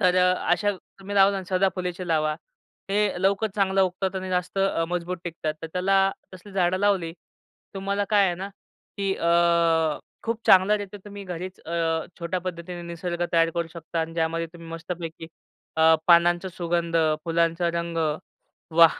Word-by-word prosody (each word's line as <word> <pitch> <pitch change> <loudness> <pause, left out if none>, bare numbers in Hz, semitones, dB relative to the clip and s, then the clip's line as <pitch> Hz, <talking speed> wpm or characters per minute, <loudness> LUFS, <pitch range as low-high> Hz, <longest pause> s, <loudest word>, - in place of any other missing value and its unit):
तर 180 -2 +4
अ, 180 0 +4 0.2
अशा 205 -1 +2 0.3
तुम्ही 200 +1 -6
लावलं 195 0 +5
अन् 190 - -4
सदाफुलीची 185 -1 0
लावा. 155 -2 +1 0.6
हे 200 -2 +1
लवकर 200 +3 +2
चांगलं 195 -1 +2
उगतात 190 +1 -1
आणि 185 0 -4
जास्त 180 +1 -1
अ, 195 -4 +2
मजबूत 180 +1 -2
टिकतात. 160 -2 -3
तर - - -3
त्याला 195 +1 +3 0.2
तसली 185 +2 -13
झाडं 185 -1 +2
लावली, 190 -5 +1 0.6
तुम्हाला 200 +1 -1
काय 205 -2 +5
आहे 175 - 0
ना 190 +3 -5 0.5
की 195 -1 0
अ, 170 -2 +3 0.2
खूप 230 0 -2
चांगल्या 190 +2 +6
रीत्या 205 0 -8
तुम्ही 205 -1 -8
घरीच 180 +1 -6
अ, 165 -1 -1
छोट्या 175 +2 -2
पद्धतीने 175 -1 -6
निसर्ग 170 0 -3
तयार 165 -1 +4
करू 170 -1 -1
शकता 165 0 -4
अन् 165 0 -4
ज्यामध्ये 165 0 0
तुम्ही 170 -1 -11
मस्तपैकी 165 0 -6 0.5
अ, 160 0 +6
पानांचा 175 +1 +5
सुगंध, 170 -1 -1 0.3
फुलांचा 170 +1 +1
रंग, 170 0 -3 0.8
वाह! 165 -1 +8
175 Hz, 160 wpm, -25 LUFS, 170-190 Hz, 0.8 s, वाह